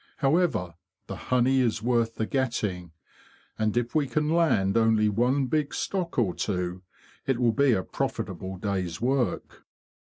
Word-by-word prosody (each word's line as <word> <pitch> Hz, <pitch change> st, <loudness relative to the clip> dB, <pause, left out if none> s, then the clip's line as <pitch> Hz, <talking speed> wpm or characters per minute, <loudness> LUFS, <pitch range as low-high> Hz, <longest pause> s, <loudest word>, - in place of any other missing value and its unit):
However, 140 Hz, -, +1 dB, 0.3 s
the -, -, -6 dB
honey 125 Hz, +1 st, +3 dB
is 115 Hz, -4 st, 0 dB
worth 115 Hz, -2 st, +1 dB
the 110 Hz, -, -1 dB
getting, 105 Hz, -, -2 dB, 0.7 s
and 110 Hz, +1 st, 0 dB
if 120 Hz, 0 st, -1 dB
we 150 Hz, -3 st, +2 dB
can 150 Hz, +4 st, 0 dB
land 135 Hz, -, +2 dB
only 110 Hz, -2 st, +3 dB
one 125 Hz, +6 st, +1 dB
big 150 Hz, +2 st, -1 dB
stock 180 Hz, -3 st, -3 dB
or 105 Hz, -8 st, +2 dB
two 90 Hz, -2 st, -3 dB, 0.5 s
it 135 Hz, -3 st, +1 dB
will 120 Hz, -1 st, +3 dB
be 140 Hz, +2 st, +3 dB
a 95 Hz, -4 st, 0 dB
profitable 95 Hz, +1 st, -4 dB
day's 95 Hz, -4 st, -3 dB
work." 125 Hz, 0 st, -1 dB
120 Hz, 150 wpm, -27 LUFS, 100-135 Hz, 0.7 s, honey